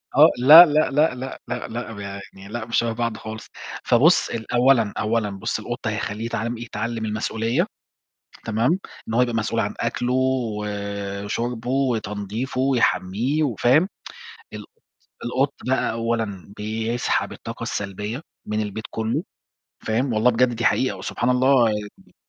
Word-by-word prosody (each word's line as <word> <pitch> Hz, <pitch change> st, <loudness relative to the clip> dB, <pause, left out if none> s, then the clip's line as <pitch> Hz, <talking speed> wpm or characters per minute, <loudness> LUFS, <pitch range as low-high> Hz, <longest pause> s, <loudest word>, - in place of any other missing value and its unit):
آه، -, -, +8 dB
لا، 150 Hz, +8 st, +11 dB
لأ، 155 Hz, -2 st, +2 dB
لأ، 150 Hz, 0 st, +3 dB
لأ، 130 Hz, +1 st, -6 dB
لأ، 125 Hz, -, -4 dB
لأ، 120 Hz, 0 st, -5 dB
يعني 100 Hz, -1 st, -9 dB
لأ 120 Hz, -2 st, -3 dB
مش 115 Hz, -, -1 dB
شَبَه 115 Hz, -1 st, +2 dB
بعض 115 Hz, -2 st, -2 dB
خالص. 110 Hz, 0 st, -8 dB, 0.4 s
فبُص 145 Hz, +9 st, +4 dB
ال 110 Hz, -1 st, -5 dB
أولًا، 120 Hz, -4 st, +4 dB
أولًا 110 Hz, 0 st, 0 dB
بُص 100 Hz, -1 st, -3 dB
القط -, -, -5 dB
هيخلّيه 105 Hz, +2 st, -3 dB
يتعمل 115 Hz, 0 st, -3 dB
يتعلم 115 Hz, 0 st, -4 dB
المسؤولية، 115 Hz, -, -1 dB, 0.8 s
تمام، 115 Hz, -, +1 dB, 0.3 s
إن 110 Hz, -, -4 dB
هو 120 Hz, -, +4 dB
يبقى 120 Hz, -2 st, +1 dB
مسؤول 110 Hz, -1 st, 0 dB
عن -, -, -2 dB
أكلُه، 125 Hz, +1 st, -1 dB
وشربُه، 105 Hz, -2 st, -2 dB
وتنضيفُه، 115 Hz, -1 st, -1 dB
ويحمّيه 130 Hz, +1 st, +1 dB
وفاهم، 140 Hz, -, +3 dB, 0.6 s
القط -, -, -9 dB, 0.6 s
القط 135 Hz, +3 st, 0 dB
بقى 130 Hz, -, +1 dB
أولًا 115 Hz, -4 st, -3 dB
بيسحب 110 Hz, +3 st, -1 dB
الطاقة -, -, -7 dB
السلبية 105 Hz, +5 st, -4 dB, 0.2 s
من 105 Hz, 0 st, -1 dB
البيت 105 Hz, +1 st, -5 dB
كٌلّه 110 Hz, +1 st, -2 dB, 0.6 s
فاهم، 120 Hz, +3 st, 0 dB
والله 110 Hz, +3 st, +4 dB
بجد 120 Hz, +1 st, +2 dB
دي 120 Hz, -, -2 dB
حقيقة 130 Hz, -, +2 dB
وسبحان 120 Hz, -, -2 dB
الله 125 Hz, -1 st, +4 dB
ي 105 Hz, -1 st, -7 dB
115 Hz, 140 wpm, -23 LUFS, 105-125 Hz, 0.8 s, لا